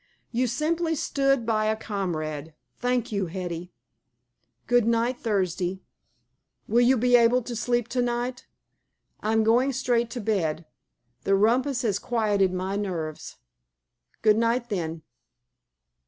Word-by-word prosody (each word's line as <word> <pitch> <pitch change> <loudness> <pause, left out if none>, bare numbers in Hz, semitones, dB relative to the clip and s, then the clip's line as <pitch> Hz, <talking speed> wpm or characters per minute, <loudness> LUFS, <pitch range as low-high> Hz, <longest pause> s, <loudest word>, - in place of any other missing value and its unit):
"You 250 +2 +1
simply 320 +6 0
stood 275 -4 +1
by 215 -1 +1
a 215 0 +2
comrade. 160 -8 -4 0.2
Thank 245 -1 0
you, 200 -3 -1
Hetty." 175 0 -5 0.9
"Good 245 -2 +3
night, 235 +2 +1
Thursday." 190 -3 -1 0.8
"Will 235 +3 +3
you 255 +2 +4
be 245 +2 +4
able 240 +1 +4
to 240 +1 -5
sleep 240 +1 0
to 250 +1 0
night?" 245 +1 -2 0.7
"I'm 220 +1 +1
going 245 +5 +3
straight 240 -2 +1
to 245 - -5
bed. 175 -7 -1 0.6
The 195 - +3
rumpus 250 +6 +2
has 205 -4 +1
quieted 205 -6 +1
my 185 +2 -2
nerves." 170 -7 -4 0.9
"Good 215 -1 +5
night, 235 +1 +1
then." 165 -5 -3
225 Hz, 125 wpm, -26 LUFS, 190-245 Hz, 0.9 s, Good